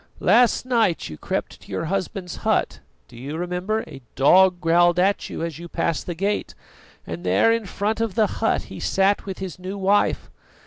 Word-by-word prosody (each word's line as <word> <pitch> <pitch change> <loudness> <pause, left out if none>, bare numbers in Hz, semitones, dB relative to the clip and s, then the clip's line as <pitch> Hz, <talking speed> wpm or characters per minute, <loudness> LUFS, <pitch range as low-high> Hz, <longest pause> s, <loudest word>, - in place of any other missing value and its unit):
Last 235 +5 +4
night 230 - +1
you 75 - -8
crept - - -4
to - - -15
your 165 - -2
husband's 185 +1 -3
hut - - 0 0.3
do - - -16
you 140 +6 -6
remember, 180 +5 -2
a 135 - -11
dog 180 +6 +5
growled 175 +1 +3
at 195 +3 +1
you - - -5
as 165 -2 -5
you 170 - -8
passed 165 -1 -2
the 175 - -3
gate? 200 +4 -2 0.5
and 85 +1 -6
there 95 - +3
in 230 -3 -1
front 210 +4 -2
of 225 -5 -2
the 220 - +4 0.2
hut 225 - +1
he - - -10
sat 195 +1 +1
with 190 - -5
his 185 -2 -7
new 190 +2 -6
wife. 200 +1 +1
185 Hz, 190 wpm, -23 LUFS, 170-205 Hz, 0.5 s, dog